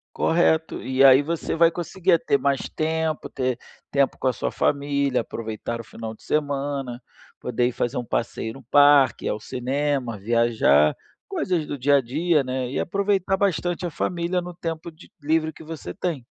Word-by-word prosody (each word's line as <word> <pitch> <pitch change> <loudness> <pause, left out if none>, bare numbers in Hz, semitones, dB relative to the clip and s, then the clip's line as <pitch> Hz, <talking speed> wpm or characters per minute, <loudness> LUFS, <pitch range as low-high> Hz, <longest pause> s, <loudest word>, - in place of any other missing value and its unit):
Correto, 160 -1 +1
e 130 +1 +2
aí 135 +1 +8
você 165 +2 -3
vai 165 0 +5
conseguir 175 +2 -1
a 165 - +6
ter 140 - +1
mais 140 -1 0
tempo, 160 -1 -2
ter 130 -2 -1 0.3
tempo 140 -1 +1
com - - -3
a 130 - +4
sua - - -3
família, 140 -2 0
aproveitar 115 0 -5
o - - -8
final 110 +1 -7
de - - -21
semana, 140 -4 -2 0.4
poder 125 0 0
ir - - -4
fazer 120 +2 -2
um 120 - -3
passeio 115 -1 -3
no 135 - -12
parque, 145 0 +5
ir - - +1
ao 105 - -1
cinema, 130 0 -2
viajar, 110 -9 +3 0.3
coisas 185 - -1
do 145 - -5
dia 140 +3 +4
a - - +4
dia, 150 +5 +1
né, 130 -1 -3
e - - -2
aproveitar 195 0 0
bastante 180 -2 0
a - - -3
família 175 +2 -1
no 180 0 -8
tempo 165 -1 -5
de 155 - -17
livre 160 +1 +1
que - - -13
você 155 - -7
tem. 160 -9 -3
145 Hz, 185 wpm, -24 LUFS, 125-165 Hz, 0.4 s, aí